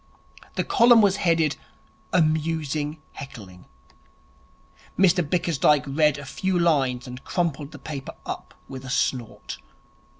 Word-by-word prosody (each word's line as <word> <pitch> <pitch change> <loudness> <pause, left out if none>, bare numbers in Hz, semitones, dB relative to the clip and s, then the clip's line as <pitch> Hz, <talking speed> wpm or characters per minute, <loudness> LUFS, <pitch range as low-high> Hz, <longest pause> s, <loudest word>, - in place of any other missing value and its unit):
The - - 0
column 235 0 +6
was 200 -1 +3
headed, 165 -5 +2 0.5
'Amusing 155 -2 0
Heckling'. 100 -10 -10 1.3
Mr 185 -1 +4
Bickersdyke 155 -3 +2
read 150 +1 +2
a 145 - -8
few 185 +6 -1
lines, 135 -8 +2
and 125 +1 -9
crumpled 155 -5 -2
the 150 - -10
paper 140 -2 -7
up - - -7
with 130 -1 -8
a 130 - -8
snort. 120 - -2
150 Hz, 120 wpm, -24 LUFS, 135-170 Hz, 1.3 s, column